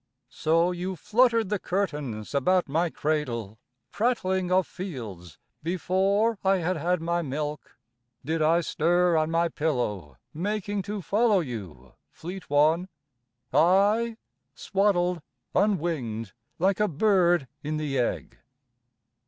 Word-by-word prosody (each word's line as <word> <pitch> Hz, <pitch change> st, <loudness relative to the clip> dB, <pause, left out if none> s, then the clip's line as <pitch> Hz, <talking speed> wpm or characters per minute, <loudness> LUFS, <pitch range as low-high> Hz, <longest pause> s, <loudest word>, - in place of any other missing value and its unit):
So 165 Hz, +3 st, +2 dB
you 180 Hz, +1 st, -4 dB
fluttered 230 Hz, +3 st, +2 dB
the 210 Hz, -1 st, 0 dB
curtains 150 Hz, -, -3 dB
about 180 Hz, +6 st, +2 dB
my 165 Hz, +5 st, +1 dB
cradle, 120 Hz, -10 st, -2 dB, 0.3 s
Prattling 190 Hz, -6 st, 0 dB
of 185 Hz, -1 st, +4 dB
fields 110 Hz, -, -8 dB, 0.2 s
Before 195 Hz, +6 st, +1 dB
I 195 Hz, 0 st, +3 dB
had 180 Hz, +1 st, -1 dB
had 175 Hz, +2 st, 0 dB
my 170 Hz, +1 st, 0 dB
milk... 150 Hz, 0 st, -5 dB, 0.5 s
Did 160 Hz, +2 st, -1 dB
I 165 Hz, +3 st, +4 dB
stir 175 Hz, +2 st, +2 dB
on 155 Hz, 0 st, +2 dB
my 165 Hz, +1 st, +2 dB
pillow, 105 Hz, -, -2 dB, 0.2 s
making 205 Hz, +4 st, -2 dB
to 205 Hz, -2 st, -3 dB
follow 215 Hz, +1 st, +3 dB
you, 95 Hz, -, -7 dB, 0.2 s
Fleet 180 Hz, +2 st, -9 dB
One? 155 Hz, +6 st, +3 dB, 0.6 s
I 205 Hz, +7 st, +3 dB, 0.4 s
swaddled, 180 Hz, -3 st, +1 dB, 0.3 s
unwinged, 150 Hz, -, 0 dB, 0.2 s
like 190 Hz, +3 st, +1 dB
a 210 Hz, -, +3 dB
bird 175 Hz, -3 st, +3 dB
in 155 Hz, +1 st, -3 dB
the 145 Hz, -3 st, -1 dB
egg. 120 Hz, -, -2 dB
170 Hz, 120 wpm, -26 LUFS, 150-190 Hz, 0.6 s, of